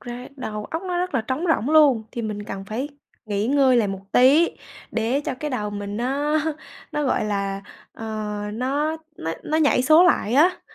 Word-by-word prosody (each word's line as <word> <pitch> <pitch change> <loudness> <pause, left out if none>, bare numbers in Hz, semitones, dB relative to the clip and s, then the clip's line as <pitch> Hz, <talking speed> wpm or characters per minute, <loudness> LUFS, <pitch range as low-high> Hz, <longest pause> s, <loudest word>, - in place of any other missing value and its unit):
ra 245 +1 -7
đầu 210 -5 -5
óc 325 +3 -4
nó 360 -2 -2
rất 360 -5 -2
là 245 - +3
trống 260 +9 -3
rỗng 295 -3 +1
luôn, 290 -8 +5
thì 235 - -4
mình 210 -1 -4
cần 195 -1 -6
phải 240 +8 -4 0.4
nghỉ 205 +1 -1
ngơi 265 -2 +4
lại 215 -4 +2
một 195 -1 -4
tí 280 +7 +5 0.4
để 235 +5 0
cho 285 - -3
cái 300 +3 -5
đầu 210 -5 -2
mình 205 0 -5
nó 285 +5 0 0.5
nó, 295 0 -1
gọi 255 - +1
là, 200 -1 -2 0.3
ờ, 225 - -9 0.5
nó 285 +7 -1 0.2
nó 165 0 -3
nó 310 - 0
nhảy 290 -5 +3
số 315 +6 +6
lại 240 - +2
á. 345 +6 +4
255 Hz, 195 wpm, -23 LUFS, 215-300 Hz, 0.5 s, số